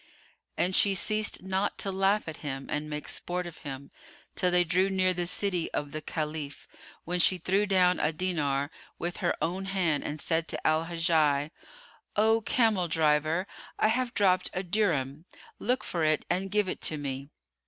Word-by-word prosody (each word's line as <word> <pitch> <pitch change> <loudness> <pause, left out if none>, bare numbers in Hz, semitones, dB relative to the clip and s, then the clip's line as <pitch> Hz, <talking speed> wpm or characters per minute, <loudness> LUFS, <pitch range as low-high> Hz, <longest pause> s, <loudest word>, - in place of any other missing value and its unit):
And 185 +1 +1
she 200 -1 +4
ceased 215 +1 0
not 190 +2 -1
to 195 - -2
laugh 195 +1 +1
at 160 - -6
him 135 -2 -5
and 150 +1 -2
make 150 0 -5
sport 180 0 -2
of 170 -2 -9
him, 140 -1 -8 0.4
till 180 - +1
they 180 0 +4
drew 180 +3 +2
near 185 -1 +2
the 175 -1 -1
city 180 -2 0
of 145 -1 -3
the 155 - -4
Caliph, 150 -2 -4 0.4
when 180 +2 -1
she 185 +2 +5
threw 195 +4 +1
down 180 -2 +3
a 150 - +2
dinar 150 -4 -1 0.3
with 175 +1 -3
her - - 0
own 185 +3 -2
hand 180 -6 0
and 150 +1 -4
said 160 +3 0
to - - -4
Al 155 +1 +2
Hajjaj, 160 -4 +1 0.6
"O 220 +2 +3
camel 215 -6 +2
driver, 155 +2 +2 0.3
I 215 - +3
have 250 +2 0
dropped 185 -3 +3
a 185 - -2
dirham; 165 -7 0 0.3
look 250 +4 0
for 170 -2 -2
it 155 -1 +2
and 190 +2 -1
give 205 0 +1
it - - -4
to 155 - +1
me." 140 -1 -5
175 Hz, 180 wpm, -28 LUFS, 155-190 Hz, 0.6 s, she